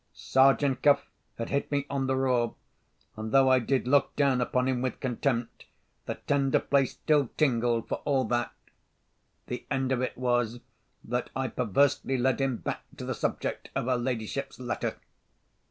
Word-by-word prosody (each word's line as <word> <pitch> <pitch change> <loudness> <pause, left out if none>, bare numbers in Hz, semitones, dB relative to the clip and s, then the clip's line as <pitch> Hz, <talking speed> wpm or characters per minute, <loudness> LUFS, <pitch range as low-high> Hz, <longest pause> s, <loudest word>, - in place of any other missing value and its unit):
Sergeant 135 0 +3
Cuff 145 -1 +4 0.3
had 115 - -4
hit 140 +1 -1
me 140 -1 0
on 135 -1 -1
the 130 - +1
raw, 125 -3 +1 0.6
and, 110 0 -5
though 135 -1 +5
I 130 - +6
did 125 +1 0
look 140 +2 +3
down 135 -3 +2
upon 125 +1 +1
him 130 -2 0
with 130 0 -2
contempt, 125 -2 -2 0.4
the - - -2
tender 140 -2 +2
place 140 -2 +1
still 145 -5 +1
tingled 120 -5 +1
for - - -2
all 135 -2 +2
that. 120 0 -1 0.9
The 125 - -5
end 135 -2 0
of 130 -1 +1
it 130 - -3
was 120 -2 0 0.4
that 125 +2 -2
I 130 -1 -1
perversely 130 +4 +1
led 130 +2 +1
him 135 -3 0
back - - -4 0.2
to - - -6
the - - -2
subject - - -3
of - - -1
her 130 0 +2
ladyship's 120 +2 -3
letter. 125 -1 -3
130 Hz, 170 wpm, -28 LUFS, 120-135 Hz, 0.9 s, I